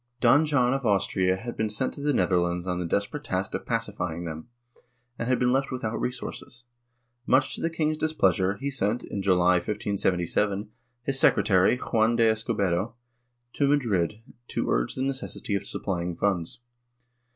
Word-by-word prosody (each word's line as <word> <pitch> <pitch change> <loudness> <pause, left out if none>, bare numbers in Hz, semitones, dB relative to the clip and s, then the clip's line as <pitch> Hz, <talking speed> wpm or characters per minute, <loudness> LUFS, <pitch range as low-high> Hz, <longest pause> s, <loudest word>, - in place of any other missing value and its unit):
Don 135 +6 +5
John 130 -4 +3
of 135 0 -2
Austria 95 -3 +2
had 120 +4 -6
been 110 0 -1
sent 105 +5 -1
to - - -8
the 145 +1 +1
Netherlands 90 -7 +1
on 90 -1 -2
the 90 - -2
desperate 100 - -2
task 95 -4 -2
of - - -4
pacifying 95 -8 -2
them, 80 +2 -6 0.7
and 115 - -2
had 130 - +3
been 125 0 +2
left 135 +1 +1
without 115 -4 -3
resources. 125 -1 -5 0.6
Much 130 +1 +3
to - - -6
the 165 - +1
king's 155 -1 -1
displeasure, 100 - +1
he 140 +1 -3
sent, 115 -3 0
in 100 - -4
July, 90 -2 +4
1577, 100 +1 -1 0.3
his 135 +1 +2
secretary, 95 +1 +4
Juan 115 -2 +1
de 115 -1 +4
Escobedo, 110 -2 0 0.6
to 140 - +1
Madrid 110 - +1 0.2
to - - -2
urge - - 0
the 130 - -2
necessity 135 -5 -3
of 100 0 -2
supplying 90 -3 -3
funds. 95 +2 -1
105 Hz, 165 wpm, -26 LUFS, 95-130 Hz, 0.7 s, Don